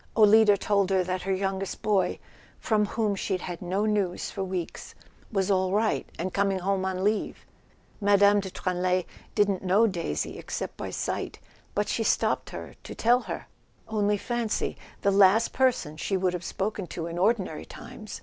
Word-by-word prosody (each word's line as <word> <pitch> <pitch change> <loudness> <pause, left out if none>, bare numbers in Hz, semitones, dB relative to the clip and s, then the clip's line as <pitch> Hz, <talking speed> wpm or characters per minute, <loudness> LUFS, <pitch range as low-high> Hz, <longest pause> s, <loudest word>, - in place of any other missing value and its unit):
Olida 215 -1 +7
told 200 -1 +1
her 190 -1 +3
that 185 0 -2
her 195 - -2
youngest 195 0 -2
boy, 200 -4 +2 0.4
from 210 -2 +1
whom 215 -1 0
she'd 190 -1 -2
had 175 -2 -6
no 190 +4 0
news 205 -4 0
for 195 - -3
weeks, 185 -3 -5 0.4
was 195 -2 +1
all 185 -1 +2
right, 215 +2 +1
and 185 +2 -3
coming 195 -1 +1
home 190 +1 0
on 190 0 -2
leave. 210 +1 -1 0.5
Mme. 205 0 +5
de 195 -1 -4
Tranlay 180 0 0 0.3
didn't 205 -3 +2
know 195 +4 +4
Daisy, 180 -6 -2
except - - -5
by - - -5
sight, - - -3 0.4
but - - +1
she - - 0
stopped - - +1
her - - -8
to - - -9
tell 240 +2 +4
her. - - -6 0.4
Only 210 -1 +1
fancy—the 225 -3 -2
last 200 +3 +5
per¬ 260 0 +5
son 155 -9 -8
she 195 +4 -1
would 185 -1 +1
have 180 0 -4
spoken 195 +1 -3
to 165 -1 -5
in 170 +1 -4
ordinary 195 -5 +1
times! 230 -4 -9
195 Hz, 170 wpm, -27 LUFS, 185-210 Hz, 0.5 s, Olida